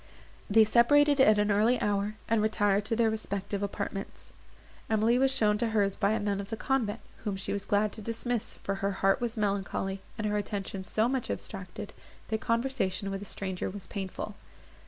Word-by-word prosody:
They 220 +2 +7
separated 285 +6 +5
at 215 -5 +6
an 210 0 +2
early 220 +5 +3
hour, 205 +1 0
and 225 -1 +2
retired 205 -1 +2
to 225 - 0
their 225 -1 +3
respective 200 -2 -3
apartments. 200 0 -5 0.6
Emily 225 +3 +3
was 270 0 +4
shown 215 -6 +2
to 235 - +1
hers 205 -3 +1
by 200 +1 +2
a 220 - 0
nun 205 -1 -1
of 200 - -9
the 225 - -3
convent, 230 -4 0 0.2
whom 205 -3 -3
she 195 - -3
was 200 0 -3
glad 205 0 +2
to 220 - -7
dismiss, 230 +1 -2
for 195 - -3
her 200 0 0
heart 195 +3 +4
was 240 -1 -2
melancholy, 195 -1 -1 0.2
and 215 - -2
her 210 0 +1
attention 195 -2 -4
so 220 +4 +1
much 260 -1 -2
abstracted, 195 -1 -5 0.4
that 220 0 -1
conversation 230 -5 0
with 195 0 -4
a - - -6
stranger 190 -2 -3
was 195 0 -6
painful. 195 +1 -5
210 Hz, 190 wpm, -29 LUFS, 200-225 Hz, 0.6 s, They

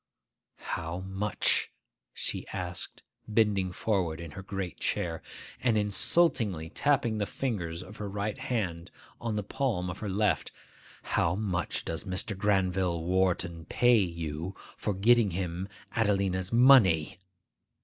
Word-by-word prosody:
'How 85 +2 -4
much,' 95 +2 +1 0.4
she - - -3
asked, 90 -2 -4 0.2
bending 105 -4 +2
forward 90 -5 0
in 85 -2 -7
her 85 - -7
great 95 -2 -5
chair, 85 -2 -1 0.4
and 120 -4 +3
insultingly 105 - +2
tapping 120 -4 +1
the 100 - 0
fingers 90 -10 -3
of 105 - -12
her 105 -1 -4
right 105 +4 -3
hand 95 -11 -2 0.3
on 115 -2 -2
the 105 - -1
palm 100 -6 -1
of 90 - -8
her 105 - -4
left,—'how 95 -3 -1
much 95 -4 -2
does 80 +4 -4
Mr. 95 +2 -2
Granville 95 -4 +1
Wharton 85 -2 0
pay 120 +7 +4
you 85 -1 -3 0.2
for 105 - -2
getting 115 +2 +5
him 90 0 -3 0.3
Adelina's 100 -4 +1
money? 115 - +6
95 Hz, 125 wpm, -29 LUFS, 90-105 Hz, 0.4 s, money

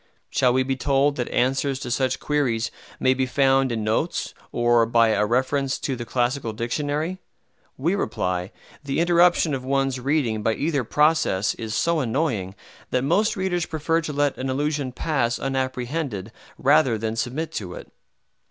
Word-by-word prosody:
Shall 125 - +3
we 130 +1 +2
be 135 +1 -1
told 140 +2 +2
that 125 - -2
answers 135 +2 +1
to 120 - -4
such 130 +1 0
queries 125 -6 0 0.3
may 130 - +3
be 130 0 -1
found 135 0 +3
in 110 -2 -2
notes, 110 +1 -1 0.2
or 120 -1 +3
by 115 0 +4
a 105 -1 +2
reference 130 +3 0
to 135 - -3
the 120 -1 -6
Classical 120 0 -1
Dictionary? 145 +9 -2 0.6
We 160 +8 +1
reply, 90 - -2 0.3
the 140 +1 -2
interruption 175 -2 +4
of 130 -2 -3
one's 135 -1 0
reading 125 -5 0
by 110 +1 +1
either 145 -4 0
process 150 -7 +2
is 110 -1 -5
so 170 +8 +1
annoying 115 - -1 0.3
that 125 - 0
most 210 +12 +2
readers 180 -3 -1
prefer 165 +1 0
to 160 - -4
let 145 -1 0
an 130 +1 -2
allusion 145 0 -1
pass 125 -4 0
unapprehended 130 - -3 0.3
rather 135 -4 +4
than 110 +1 -3
submit 130 +8 -3
to 90 -4 -5
it. - - -11
130 Hz, 160 wpm, -24 LUFS, 120-150 Hz, 0.6 s, by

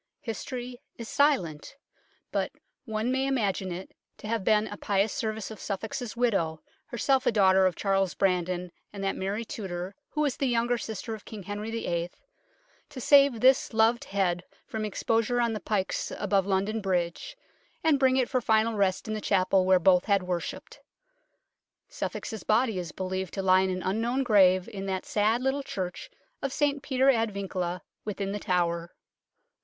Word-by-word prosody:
History 245 +2 -6 0.2
is 230 - -7
silent, 220 - +1 0.6
but - - -1 0.3
one 220 +1 -1
may 265 +1 +1
imagine 200 -8 0
it 180 +2 -6 0.3
to - - -9
have 225 -2 -1
been 215 +1 +3
a 205 - -6
pious 200 +1 0
service 220 -5 -3
of 220 - -9
Suffolk's 220 +4 -4
widow 195 -10 0 0.2
herself 260 +2 +1
a - - +5
daughter 190 -3 +5
of 180 - -2
Charles 195 -2 0
Brandon 180 -1 0 0.2
and 200 -1 -6
that 195 - 0
Mary 200 +4 -3
Tudor 185 -3 -5 0.2
who 300 - -2
was 285 -4 0
the 275 - 0
younger 240 0 +1
sister 225 +1 -5
of 215 - -8
King 215 -4 -9
Henry 205 +3 -5
VIII. 175 -7 -2 0.8
to 295 -3 -8
save 275 -3 +5
this 260 -3 +4
loved 225 +2 +3
head 185 -3 0 0.2
from 220 -1 -4
ex 210 - -5
posure 230 +2 +2
on 235 -1 +1
the 215 - -3
pikes 200 -3 -2
above 200 -2 +1
London 200 +3 0
Bridge, 190 - -2 0.5
and 310 -3 +4
bring 260 -1 +4
it 255 -2 +2
for 255 -2 0
final 220 0 +2
rest 195 -2 0
in 215 - -2
the 215 - -3
chapel 190 -1 +2
where 190 0 +6
both 180 0 +4
had 200 -3 +2
worshipped. 180 -1 -4 1.1
Suffolk's 220 -4 -5
body 220 -2 +2
is 175 -3 -5
believed 185 0 -4
to 195 - -2
lie 185 0 +5
in 190 - +1
an 185 -1 -3
unknown 230 +7 0
grave 185 -6 +5
in 195 -1 -6
that 190 -1 -2
sad 220 +4 +1
little 265 +2 +1
church 185 -9 -5 0.3
of 275 - -2
St 285 0 0
Peter 265 -1 +3
ad 225 -3 +1
Vincula, 185 -3 -3 0.2
within 200 -2 -3
The 205 - -3
Tower. 170 -2 -1
210 Hz, 175 wpm, -28 LUFS, 190-235 Hz, 1.1 s, where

